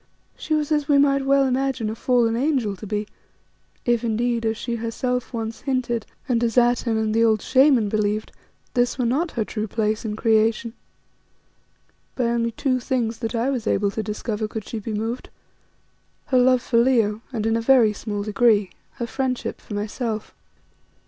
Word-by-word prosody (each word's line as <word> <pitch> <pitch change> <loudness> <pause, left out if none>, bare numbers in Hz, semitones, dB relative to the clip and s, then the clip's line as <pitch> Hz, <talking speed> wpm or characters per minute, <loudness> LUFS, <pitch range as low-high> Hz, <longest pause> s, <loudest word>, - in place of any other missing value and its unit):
She 310 - -2
was 300 0 -1
as 295 -2 +1
we 285 - +4
might 275 -1 +3
well 275 0 +4
imagine 265 -2 0
a - - -5
fallen 235 -1 +2
angel 250 -6 0
to 210 +3 -9
be, 210 +1 -2 0.8
if 240 -1 +2
indeed, 230 0 0
as 220 0 -1
she 235 0 -3
herself 245 +2 -2
once 225 -2 -4
hinted 245 -4 -1 0.2
and 240 -2 +1
as 230 -1 0
Atene 240 -1 +3
and 220 -1 0
the 230 +1 +3
old 220 -2 +2
Shaman 265 -4 +4
believed, 210 0 -1 0.4
this 245 +1 +1
were 250 - 0
not 290 +9 +1
her 225 -3 -1
true 215 0 -4
place 215 0 -1
in 215 -2 -3
creation. 225 +1 +2 1.4
By 255 - -1
only 235 0 0
two 255 +1 0
things 235 -3 -1
that 225 0 -3
I 235 +4 +1
was 240 -5 -3
able 200 0 +1
to 220 - -3
discover 215 +1 -3
could 220 -1 -6
she 225 - -4
be 220 +2 -6
moved 225 +4 -3 1.0
her 255 - +2
love 255 0 +4
for 235 - 0
Leo 225 -4 +2
and, 220 -4 -3
in 225 0 +2
a 230 - 0
very 230 -3 +5
small 205 -1 -4
degree, 210 -2 +2 0.2
her 235 - -4
friendship 255 +1 -3
for 210 - -7
myself. 215 +1 -3
230 Hz, 180 wpm, -23 LUFS, 220-255 Hz, 1.4 s, very